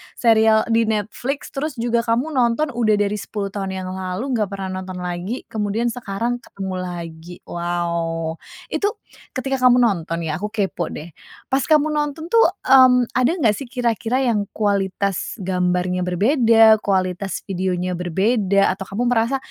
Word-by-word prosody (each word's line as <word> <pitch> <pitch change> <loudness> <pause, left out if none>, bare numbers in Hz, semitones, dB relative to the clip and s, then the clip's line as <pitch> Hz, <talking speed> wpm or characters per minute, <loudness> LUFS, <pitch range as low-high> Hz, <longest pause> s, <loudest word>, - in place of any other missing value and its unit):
serial 220 -2 +4
di 230 0 +3
Netflix 225 +6 -3
terus 295 +2 -3
juga 235 0 0
kamu 240 +7 0
nonton 255 +3 +1
udah 225 -3 +2
dari 205 0 0
10 200 0 -4
tahun 195 -2 -3
yang 185 -1 -5
lalu 190 +7 -4
nggak 210 -2 0
pernah 195 -1 -5
nonton 185 -1 -7
lagi 180 +7 -4
kemudian 220 +2 -1
sekarang 235 +1 -3
ketemu 190 -4 -6
lagi. 170 -2 -7
Wow! 170 -1 -2 0.3
Itu 410 0 0 0.4
ketika 270 +1 -1
kamu 250 0 +6
nonton 170 -7 0
ya, 155 0 -2
aku 210 - -2
kepo 195 -5 -1
deh. 165 +3 -8 0.4
Pas 265 - +3
kamu 310 -1 +4
nonton 295 +1 -2
tuh, 460 0 +6 0.2
mmm, 255 -2 +6
ada 255 +3 +3
nggak 230 -8 +3
sih 275 - -7
kira-kira 245 0 0
yang 215 -5 +1
kualitas 200 -2 -1
gambarnya 180 0 0
berbeda, 225 - +5
kualitas 190 -1 -1
videonya 185 -1 -1
berbeda, 195 +3 +2
atau 195 +1 -7
kamu 205 +5 -2
merasa 235 +3 +2
210 Hz, 150 wpm, -21 LUFS, 185-240 Hz, 0.4 s, kamu